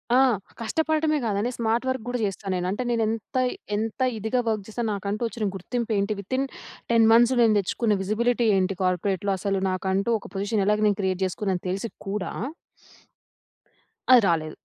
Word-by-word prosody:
ఆ! -, -, +6 dB, 0.4 s
కష్టపడడమే 310 Hz, +5 st, +1 dB
కాదండి, 210 Hz, +2 st, 0 dB
smart 230 Hz, +2 st, 0 dB
work 260 Hz, -3 st, -1 dB
గూడా 245 Hz, 0 st, -2 dB
చేస్తాను 195 Hz, -1 st, -3 dB
నేను. 180 Hz, 0 st, -1 dB
అంటే, 210 Hz, +6 st, -2 dB
నేను 230 Hz, -1 st, +1 dB
ఎంత, 225 Hz, +3 st, -3 dB, 0.4 s
ఎంత 220 Hz, +3 st, -3 dB, 0.2 s
ఇదిగా 220 Hz, +4 st, -1 dB
వర్క్ 215 Hz, -3 st, -1 dB
చేస్తాను. 225 Hz, 0 st, -3 dB
నాకంటూ 200 Hz, +2 st, -3 dB
వచ్చిన 225 Hz, -2 st, -4 dB
గుర్తింపు 230 Hz, +5 st, -3 dB
ఏంటి? 200 Hz, +2 st, 0 dB
వితిన్ 260 Hz, +7 st, -1 dB, 0.5 s
10 225 Hz, -1 st, +5 dB
మంత్స్ 235 Hz, +2 st, +6 dB
నేను 220 Hz, -2 st, +5 dB
తెచ్చుకున్న 210 Hz, +3 st, 0 dB
విజిబిలిటీ 235 Hz, +4 st, +1 dB
ఏంటి? 190 Hz, 0 st, 0 dB
కార్పొరేట్‌లో. 190 Hz, +2 st, 0 dB
అసలు 195 Hz, 0 st, 0 dB
నాకంటూ 190 Hz, +3 st, -1 dB
ఒక -, -, -13 dB
పొజిషన్ 200 Hz, +1 st, 0 dB
ఎలాగ 210 Hz, 0 st, +3 dB
నేను 205 Hz, -1 st, +1 dB
క్రియేట్ 190 Hz, 0 st, -1 dB
చేసుకున్నానని, 185 Hz, 0 st, -2 dB
తెలిసి 195 Hz, +5 st, -2 dB, 0.2 s
కూడా 195 Hz, -1 st, -2 dB, 1.8 s
అది 250 Hz, -2 st, +9 dB
రాలేదు. 155 Hz, -2 st, 0 dB
210 Hz, 160 wpm, -25 LUFS, 195-235 Hz, 1.8 s, అది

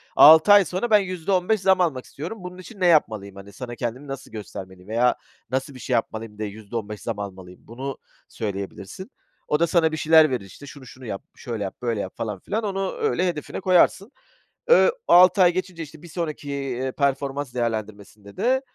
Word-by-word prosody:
6 160 Hz, +6 st, +9 dB
ay 200 Hz, -2 st, +7 dB
sonra, 185 Hz, +8 st, -2 dB
ben 210 Hz, -1 st, +6 dB
%15 185 Hz, +2 st, 0 dB
zam 190 Hz, -1 st, +4 dB
almak 145 Hz, -8 st, 0 dB
istiyorum. 165 Hz, +10 st, -7 dB
Bunun 180 Hz, 0 st, -8 dB
için 195 Hz, +3 st, -12 dB
ne 185 Hz, -, +1 dB
yapmalıyım? 110 Hz, -, +2 dB
Hani, 100 Hz, +1 st, -12 dB
sana 120 Hz, +3 st, -7 dB
kendimi 125 Hz, +4 st, -5 dB
nasıl 135 Hz, -1 st, -7 dB
göstermeliyim 95 Hz, -3 st, -9 dB
veya 120 Hz, +2 st, +2 dB, 0.3 s
nasıl 135 Hz, +2 st, -2 dB
bir 130 Hz, -, -11 dB
şey 125 Hz, -, -3 dB
yapmalıyım 110 Hz, -2 st, -2 dB
de 110 Hz, -, -3 dB
%15 105 Hz, 0 st, -6 dB
zam 115 Hz, -3 st, -4 dB
almalıyım? 95 Hz, -2 st, -8 dB
Bunu 130 Hz, +4 st, -6 dB, 0.3 s
söyleyebilirsin. 100 Hz, -, -6 dB, 0.4 s
O 150 Hz, -, +1 dB
da 170 Hz, -, +3 dB
sana 165 Hz, -1 st, +3 dB
bir 155 Hz, -, -3 dB
şeyler 160 Hz, 0 st, +6 dB
verir 125 Hz, -7 st, -3 dB
işte. 95 Hz, +9 st, -13 dB
Şunu 140 Hz, -1 st, -12 dB
şunu 130 Hz, 0 st, -13 dB
yap, 100 Hz, -1 st, -5 dB
şöyle 115 Hz, -5 st, -5 dB
yap, 95 Hz, -, -5 dB
böyle 115 Hz, -3 st, -1 dB
yap 95 Hz, -, -6 dB
falan 105 Hz, -4 st, -4 dB
filan. 220 Hz, -, -3 dB
Onu 195 Hz, -2 st, -2 dB
öyle 185 Hz, -, 0 dB
hedefine 160 Hz, -4 st, -4 dB
koyarsın. 190 Hz, +3 st, +3 dB, 0.6 s
Iıı, -, -, +6 dB, 0.2 s
6 180 Hz, +2 st, +7 dB
ay 175 Hz, -1 st, +6 dB
geçince 180 Hz, -2 st, -4 dB
işte 155 Hz, 0 st, -13 dB
bir 175 Hz, -, -12 dB
sonraki, 155 Hz, -4 st, -5 dB
eee, 130 Hz, -2 st, -3 dB
performans 140 Hz, -1 st, -1 dB
değerlendirmesinde 110 Hz, -3 st, -5 dB
de, 260 Hz, +2 st, +2 dB
135 Hz, 190 wpm, -23 LUFS, 110-175 Hz, 0.6 s, 6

